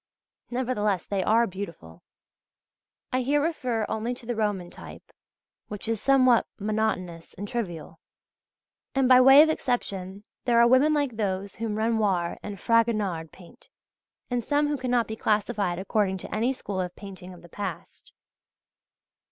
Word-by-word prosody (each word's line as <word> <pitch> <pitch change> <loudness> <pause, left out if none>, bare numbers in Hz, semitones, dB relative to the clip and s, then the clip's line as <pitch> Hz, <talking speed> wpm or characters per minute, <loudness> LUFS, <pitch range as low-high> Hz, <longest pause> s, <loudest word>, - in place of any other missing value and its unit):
Nevertheless 225 -7 -1
they 200 -2 -1
are 230 +4 +4
beautiful 170 - -8 1.1
(I 255 - +2
here 285 +4 +2
refer 255 -8 -1
only 230 +3 -2
to 245 - -10
the 240 0 -2
Roman 205 -5 -2
type, - - -12 0.6
which 210 +1 -5
is 225 -2 -1
somewhat 255 -3 +4
monotonous 205 -5 -2
and 205 - -6
trivial) 175 -8 -5 1.0
and 270 -1 +3
by 255 0 +7
way 270 +3 +9
of 315 - +1
exception 200 -9 -3 0.2
there 235 -2 +4
are 235 - +7
women 270 +5 +4
like 280 -6 -1
those 200 -2 -2
whom 225 -2 -3
Renoir 210 -6 0
and 205 -2 -7
Fragonard 215 -9 +1
paint, 180 -2 -17 0.6
and 245 -1 0
some 290 +4 +1
who 295 - -1
cannot 245 -2 +1
be 220 - -5
classified 210 -4 0
according 190 0 0
to 185 - -7
any 230 +4 +1
school 200 -7 -4
of 180 -1 -5
painting 190 -2 -10
of 175 -1 -14
the - - -13
past. 205 +5 -7
215 Hz, 150 wpm, -26 LUFS, 190-245 Hz, 1.1 s, way